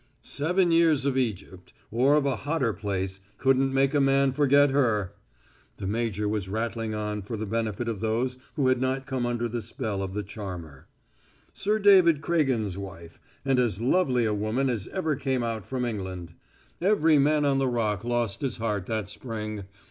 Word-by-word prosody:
"Seven 175 +5 +1
years 165 -4 +4
of 140 -2 +1
Egypt 100 -7 -3 0.2
or 130 +6 +4
of 150 -2 +2
a 135 -4 +1
hotter 145 -5 -1
place 95 -2 -3 0.2
couldn't 135 +1 +2
make 135 +1 +2
a 145 - +3
man 135 0 +3
forget 145 0 +4
her!" 115 -9 +1 0.6
The - - -6
major 105 0 -1
was 105 -3 -2
rattling 115 +1 -2
on 105 0 -3
for 110 +4 -5
the 110 - -3
benefit 110 +1 -2
of 110 -4 -2
those 120 +4 -1 0.2
who 140 -5 +1
had 130 -1 +2
not 130 +1 -1
come 130 -3 -2
under 120 0 -1
the 120 0 -3
spell 110 -2 -4
of 95 -1 -4
the 105 - -2
charmer. 90 -9 -8 0.7
"Sir 210 +2 0
David 190 -7 +6
Craigen's 130 - 0
wife, 85 -4 -9 0.3
and 135 -2 +2
as 115 -6 +1
lovely 125 -2 +2
a 110 - +1
woman 110 +6 0
as 110 -5 -3
ever 160 -6 -1
came 130 -2 -1
out 110 -3 -3
from 125 0 -2
England. 95 -7 -5 0.5
Every 165 -6 +4
man 150 +1 +3
on 135 -1 +2
the 135 - +1
Rock 110 -5 -1
lost 120 -1 -1
his 135 -4 -2
heart 105 -5 -2
that 110 -3 -2
spring. 110 -2 -6
120 Hz, 180 wpm, -27 LUFS, 105-135 Hz, 0.7 s, David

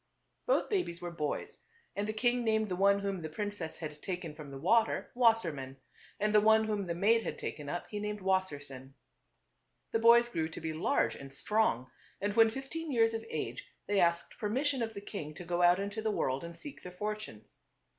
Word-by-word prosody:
Both - - +3
babies 360 - -1
were 175 -1 -5
boys, 150 -3 -3 0.4
and 205 +1 -1
the - - 0
king 240 +2 +1
named 220 -2 +1
the 180 - -1
one 200 +2 +4
whom 200 -1 -2
the 155 - -5
princess 205 -1 -4
had 150 -2 -7
taken 180 -4 -4
from 150 -2 -10
the 135 - -7
water 225 +10 +2
Wassermann, 170 - +2 0.4
and 210 +1 +1
the 210 - +7
one 220 +1 +6
whom 210 -3 -1
the 170 - -2
maid 225 +6 +4
had - - -4
taken 145 -2 -5
up, 175 +3 -3
he 210 - -3
named 210 0 -3
Wassersein. 145 -9 -2 1.0
The 225 - +2
boys 235 +1 +7
grew 160 -9 -2
to - - -7
be 160 0 -3
large 115 -7 +1
and 135 0 -10
strong, 140 - 0 0.3
and 205 +1 -1
when 225 0 +6
fifteen 270 +6 -5
years 225 -3 +3
of 225 0 -3
age 125 -5 -3 0.2
they 205 -1 +1
asked 170 -1 +1
permission 260 +5 0
of 225 -1 -2
the 200 - -5
king 155 -7 -6
to 180 - -8
go 175 +1 0
out 175 +1 +6
into 205 +2 -3
the 220 - 0
world 135 -9 0
and 170 0 -8
seek 290 -2 -9
their 180 - -8
fortunes. 210 - -6
200 Hz, 205 wpm, -32 LUFS, 160-220 Hz, 1.0 s, the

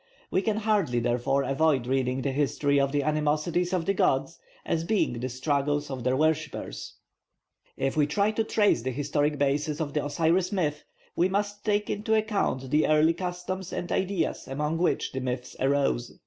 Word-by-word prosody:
We 190 - +2
can 215 +1 0
hardly 205 - +1
therefore 125 +4 +1
avoid 135 -2 +2
reading 130 0 0
the 140 - 0
history 140 0 +1
of 140 0 +1
the 145 0 0
animosities 155 +4 0
of 180 -3 0
the 195 - +2
gods 165 -2 +1 0.3
as 165 - 0
being 170 - 0
the 130 +2 -3
struggles 145 +2 -1
of 130 -2 -5
their 130 +1 +1
worshippers. 155 -1 -1 0.8
If 135 0 -1
we 150 -2 +3
try 200 +8 +1
to 220 +1 0
trace 210 - +2
the 130 - -2
historic 145 +3 0
basis 145 +2 0
of 150 -3 -3
the 150 - 0
Osiris 165 +5 +1
myth, 150 -7 -1 0.3
we 180 +2 +2
must 205 +1 -2
take 210 -1 +1
into 215 +2 0
account 200 - -1
the 150 +1 +3
early 155 +2 +4
customs 180 +1 -4
and 175 - -4
ideas 190 -2 -1
among 150 +4 -2
which 175 - 0
the 130 - -3
myths 125 0 -4
arose. 135 - 0
150 Hz, 175 wpm, -27 LUFS, 135-180 Hz, 0.8 s, early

